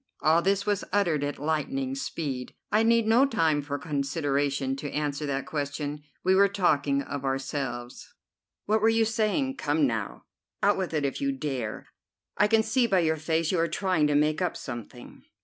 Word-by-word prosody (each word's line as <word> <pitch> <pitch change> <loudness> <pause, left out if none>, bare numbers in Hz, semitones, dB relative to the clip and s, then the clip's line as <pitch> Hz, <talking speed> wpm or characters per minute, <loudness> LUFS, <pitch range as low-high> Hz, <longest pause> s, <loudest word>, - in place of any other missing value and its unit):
All 160 +2 +4
this 195 +2 +1
was 205 -2 0
uttered 175 -7 +1
at 145 0 -3
lightning 135 -4 -1
speed. 135 -2 -4 0.2
"I 215 - +4
need 230 0 +3
no 225 +4 +5
time 160 - +1
for 145 0 -4
consideration 140 -3 -1
to 145 +1 -5
answer 150 0 -2
that 135 -1 -2
question. 145 0 -4 0.2
We 185 - +4
were 200 +1 +6
talking 150 -8 +1
of 140 -1 -5
ourselves." 135 -2 -4 0.5
"What 215 +1 +2
were 220 - +5
you 225 0 +3
saying? 225 +5 0
Come 150 0 +1
now, 110 - -3 0.4
out 205 -1 +3
with 180 -4 -2
it 150 -2 +1
if 140 - -3
you 275 0 +1
dare. 135 - -4 0.5
I 210 - +4
can 220 0 +3
see 240 +2 +2
by 190 -4 +3
your 160 -1 +1
face 160 +1 0
you 180 - +1
are 165 - +2
trying 175 -3 +1
to 145 - +1
make 150 +3 +2
up 180 -2 -1
something." 120 -5 -9
155 Hz, 185 wpm, -27 LUFS, 140-200 Hz, 0.5 s, were